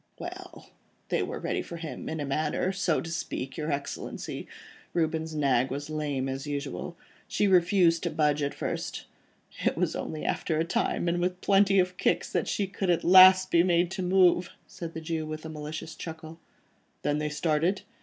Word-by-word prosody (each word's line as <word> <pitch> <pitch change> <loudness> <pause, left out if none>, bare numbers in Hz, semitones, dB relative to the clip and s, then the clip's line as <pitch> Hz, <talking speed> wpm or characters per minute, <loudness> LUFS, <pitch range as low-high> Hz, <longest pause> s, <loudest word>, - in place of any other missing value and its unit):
"Well! - - -9 0.4
they - - +1
were - - -3
ready - - -2
in 160 -1 -5
a 145 - -2
manner, 155 +6 0
so 190 -4 0
to 165 - -6
speak, 135 -5 -4
your 155 -1 -3
Excellency. 140 0 -5 0.5
Reuben's 160 -1 -1
nag 135 -3 +2
was 145 +3 -5
lame 145 -4 -2
as 135 +2 -4
usual; 145 +4 -4 0.3
she 205 - +1
refused 175 -2 +4
to - - -1
budge 150 -1 +1
at 140 0 -2
first. - - -4 0.6
It - - +1
was - - 0
only 155 - -4
after 160 - -1
a 160 - +2
time 170 - 0
and 170 +1 +1
with 180 0 -1
plenty 195 0 +4
of 180 -1 +2
kicks, - - 0
that - - 0
she 195 -2 -2
at 180 -3 +2
last 185 +1 +8
could - - +4
be - - +7
made 175 0 +2
to 190 - -3
move," 180 -1 +4 0.2
said 170 -3 -8
the 160 - -4
Jew 160 -1 -3
with 155 0 -6
a - - -5
malicious 155 +1 -6
chuckle. 160 0 -8 0.6
"Then 145 0 +1
they 150 0 -1
started?" 160 +4 0
160 Hz, 180 wpm, -28 LUFS, 150-180 Hz, 0.6 s, last